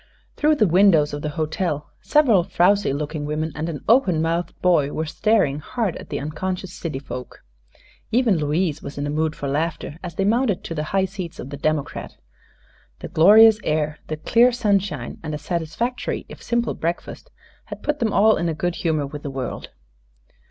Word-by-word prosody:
Through 305 +1 +3
the 220 - +3
windows 170 -4 +4
of 145 - -4
the 150 - -2
hotel 155 -1 -2
several 245 - +4
frowsy 195 +2 +2
looking 150 +2 -3
women 155 +2 -2
and 155 +3 -3
an 150 -5 -5
open 215 -9 +4
mouthed 165 +2 -2
boy 165 -6 +3
were 160 - -2
staring 160 -4 +1
hard 215 +3 -2
at - - -11
the - - -3
unconscious 180 +5 -4
city 160 -6 -5
folk. 130 -2 -8 0.7
Even 230 -5 +3
Louise 155 +1 0
was 140 - -8
in 145 - -2
a 145 - -2
mood 155 +1 0
for 140 - -5
laughter 150 +2 -2
as 175 -3 -6
they 195 - 0
mounted 225 -2 +1
to - - -5
the 155 -1 -3
high 195 -1 +2
seats 185 -3 -7
of 135 - -8
the - - -4
democrat. 155 0 -2 0.8
The - - -8
glorious 215 +6 +7
air, 150 0 -1
the 155 - -4
clear 235 +10 +4
sunshine 200 - -1
and 155 -1 -4
a - - -3
satisfactory 170 - -3
if - - -12
simple 235 0 0
breakfast 170 - -4 0.4
had - - -9
put 300 0 -1
them 225 -3 +1
all 215 +3 +4
in 170 - -1
a 160 - -2
good 175 +2 -2
humor 155 -5 0
with 145 +1 -8
the 145 - -5
world. 135 -2 -5
165 Hz, 185 wpm, -22 LUFS, 150-205 Hz, 0.8 s, glorious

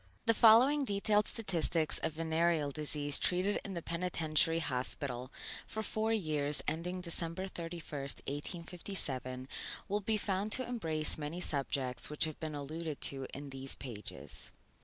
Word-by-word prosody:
The 230 - +5
following 245 +7 +7
detailed 210 -2 +2
statistics 170 -7 +3
of 160 - 0
venereal 160 -1 +1
disease 145 0 +1
treated 185 +3 +2
in 195 - -5
the 170 - -4
Penitentiary 165 -2 +2
Hospital 130 -3 -2 0.4
for 220 - -3
four 220 +1 0
years 150 -8 +1
ending 180 +3 -2
December 170 +1 -2
31, 170 -2 -6 0.4
1857, 145 -4 -3 0.4
will 205 +1 0
be 215 +2 +2
found 200 +1 -1
to 255 -1 +1
embrace 160 -12 +1
many 150 +4 -4
subjects 135 -5 0
which 150 - +1
have 155 -2 -1
been 155 -2 -3
alluded 155 +1 -4
to 135 -1 -1
in 140 0 -7
these 135 0 -1
pages. 115 -6 -5
165 Hz, 140 wpm, -34 LUFS, 145-190 Hz, 0.4 s, following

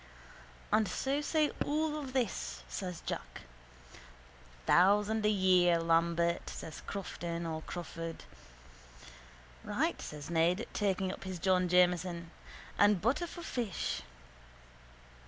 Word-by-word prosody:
_ - - -20 0.7
—And 215 -1 +3
so 275 +10 -1
say 305 0 +2
all 305 +1 0
of 275 -3 -6
us, 60 - -1
says 180 - -5
Jack. - - -5 1.2
—Thousand 210 +4 +4
a - - +4
year, 185 -4 +4
Lambert, 170 +1 +2
says 160 - -7
Crofton 170 -3 -4
or 160 -1 -3
Crawford. 165 -1 -6 1.4
—Right, - - -1
says 150 +2 -7
Ned, 170 +5 +2
taking 190 -2 0
up - - -8
his 190 -1 -5
John 185 +1 +2
Jameson. 175 -1 +2 0.5
And 205 -1 +5
butter 265 - +1
for 345 0 -9
fish. 235 - -2
185 Hz, 115 wpm, -33 LUFS, 170-215 Hz, 1.4 s, And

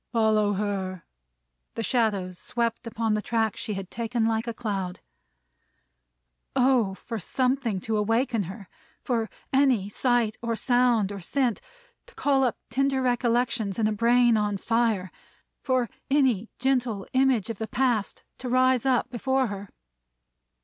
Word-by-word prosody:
"Follow 215 -3 +3
her!" 190 -3 -3 0.7
The 230 - -2
shadows 200 -6 0
swept 235 0 -2
upon 225 -1 -1
the 215 - 0
track 225 -1 0
she 225 -2 -4
had 190 -1 -6
taken 230 0 -1
like 225 +1 0
a 235 - -2
cloud. 195 -6 -3 1.6
Oh, 250 -7 +3
for 230 +2 -6
something 255 0 0
to 220 +2 -1
awaken 225 0 +1
her! 195 0 -9 0.4
For 230 -4 -1 0.2
any 260 -8 +3
sight 240 -1 +1
or 230 -1 -1
sound, 245 -4 +2
or 200 - -6
scent, 245 +5 0 0.5
to - - -17
call 275 -2 +2
up 250 - 0
tender 270 +2 +1
recollections 240 -4 0
in 225 - +1
a 215 - +2
brain 235 +1 +4
on 210 -1 0
fire! 225 -3 0 0.5
For 255 -3 +1 0.2
any 260 -7 +2
gentle 245 -6 0
image 260 -5 +2
of 220 - -8
the 220 - -3
Past, 240 -6 0 0.2
to 250 - -5
rise 255 0 +3
up 255 -1 +1
before 265 +2 +1
her! 200 -1 -7
230 Hz, 140 wpm, -26 LUFS, 210-250 Hz, 1.6 s, brain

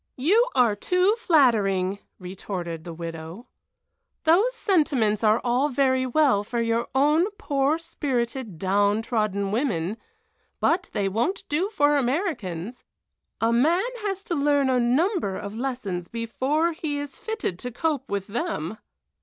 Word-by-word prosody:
"You 405 - +3
are 235 -4 +4
too 365 - +2
flattering!" 205 - +3 0.2
retorted 180 -3 -6
the 170 - -6
widow. 165 +5 -7 0.8
"Those 395 +10 +3
sentiments 270 - +1
are 215 +1 +4
all 250 +4 +1
very 260 -1 +1
well 255 -6 +3
for 235 +3 -3
your 230 0 0
own 300 +7 +3
poor 285 -5 +1
spirited, 260 - -3
down 200 +4 +1
trodden 210 -4 -1
women, 215 - -1 0.6
but 350 +1 +1
they 205 -3 0
won't 240 - -1
do 335 +7 0
for 295 -8 +3
Americans! 245 - -2 0.6
A 225 +1 +2
man 320 - +3
has 395 -2 -3
to 350 - -3
learn 285 -3 +2
a 250 - +2
number 255 - +1
of 200 0 -6
lessons 220 -8 -4
before 260 - -1
he 310 -3 -3
is 285 -1 -6
fitted 440 - -3
to 250 - -4
cope 285 0 -2
with 200 -1 -2
them." 220 - -3
250 Hz, 135 wpm, -25 LUFS, 205-310 Hz, 0.8 s, are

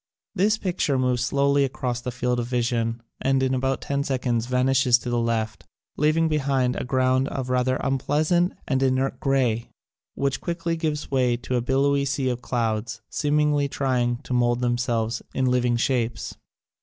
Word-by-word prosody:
This 210 +4 +2
picture 175 -8 0
moves 125 -1 +1
slowly 140 +2 +2
across 125 -2 -2
the 125 - -4
field 125 0 -1
of 120 - -2
vision 115 -1 -1 0.2
and 135 0 +2
in 130 0 +1
about 130 +1 0
ten 140 0 -1
seconds 125 -4 -1
vanishes 125 0 +3
to 120 0 -5
the 120 - +1
left, 115 -2 -2 0.3
leaving 155 +2 +2
behind 135 -4 +1
a - - -3
ground 130 +1 +1
of 130 -2 -4
rather 125 0 +2
unpleasant 150 +7 +1
and 130 -2 +1
inert 130 0 +1
grey 125 -4 +1 0.5
which 140 -1 -1
quickly 170 -1 -2
gives 155 -3 -3
way 125 -3 +2
to 125 +1 -3
a 120 - +1
billowy 140 +3 +2
sea 135 -1 0
of 125 -1 -3
clouds, 115 -3 -2
seemingly 150 -1 +1
trying 125 -3 0
to - - -4
mould 120 -1 +2
themselves 120 -2 0
in 130 - +1
living 125 -1 +2
shapes. 120 -4 -1
130 Hz, 165 wpm, -24 LUFS, 120-140 Hz, 0.5 s, vanishes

